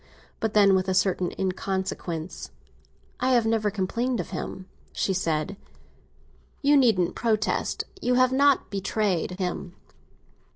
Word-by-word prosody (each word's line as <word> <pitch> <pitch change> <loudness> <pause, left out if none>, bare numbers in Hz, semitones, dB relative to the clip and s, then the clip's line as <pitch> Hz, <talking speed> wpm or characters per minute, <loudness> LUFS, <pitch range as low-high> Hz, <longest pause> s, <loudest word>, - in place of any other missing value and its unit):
But 220 -1 -2
then, 200 -2 +6
with 190 0 +1
a 190 - +1
certain 185 -1 +1
inconsequence—"I 190 +4 -5
have 240 -2 +3
never 225 -2 +1
complained 230 +5 -1
of 175 - -5
him!" 185 - -5 0.3
she 195 - -1
said. 165 +1 -1 1.1
"You 290 +1 +5
needn't 225 -10 +3
protest—you 235 - -1
have 255 0 +4
not 280 -2 +3
betrayed 195 -3 -1
him. 180 -1 -4
195 Hz, 115 wpm, -26 LUFS, 185-235 Hz, 1.1 s, then